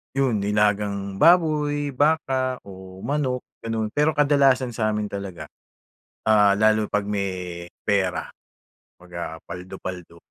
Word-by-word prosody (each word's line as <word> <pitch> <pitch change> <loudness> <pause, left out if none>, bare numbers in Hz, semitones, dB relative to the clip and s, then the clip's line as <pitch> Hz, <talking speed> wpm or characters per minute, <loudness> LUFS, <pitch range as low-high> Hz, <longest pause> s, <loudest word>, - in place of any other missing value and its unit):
'Yun 130 -6 +2
nilagang 100 -1 0
baboy, 150 -4 +3
baka 135 -3 +1
o 95 -1 -11
manok, 135 -3 -1 0.2
ganun. 110 -1 -3
Pero 150 +3 +2
kadalasan 140 -3 +3
sa 110 -1 -1
amin 105 -1 -2
talaga, 100 -3 -6 0.8
ah, 105 -2 +5
lalo 110 0 +3
'pag 105 - 0
may 90 -3 -3 0.2
pera 95 -3 0 0.7
'pag, 90 0 -18
ah, 80 -1 -5
paldo-paldo 90 -2 -8
105 Hz, 115 wpm, -24 LUFS, 95-135 Hz, 0.8 s, ah